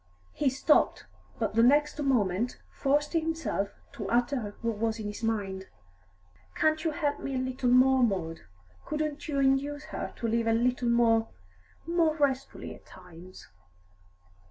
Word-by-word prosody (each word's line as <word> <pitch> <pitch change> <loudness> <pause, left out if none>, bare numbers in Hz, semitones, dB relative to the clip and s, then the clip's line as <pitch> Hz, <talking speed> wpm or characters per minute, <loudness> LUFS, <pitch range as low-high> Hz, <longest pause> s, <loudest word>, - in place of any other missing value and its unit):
He 290 - +1
stopped, 275 +4 +2 0.3
but - - -1
the 230 - +4
next 295 +5 +3
moment 235 -4 0
forced 290 +3 0
himself 325 -11 -1 0.2
to 205 -3 -6
utter 240 -3 0
what 230 -2 -1
was 225 0 0
in 215 - -5
his 205 +1 -5
mind. 200 -4 -2 0.9
"Can't 310 0 +2
you 330 - +1
help 295 -2 -1
me 275 - -4
a - - 0
little 255 -1 -1
more, 260 +1 +5
Maud? 185 -8 0 0.4
Couldn't 305 -1 -3
you 290 -3 -2
induce 275 +2 +1
her - - -4
to 230 - -3
live 230 0 0
a 225 - +3
little 245 +1 +1
more 230 -1 +3 0.6
more 335 -2 +2
restfully 275 -2 -1
at - - -17
times?" 180 +2 -13
255 Hz, 150 wpm, -29 LUFS, 225-290 Hz, 0.9 s, more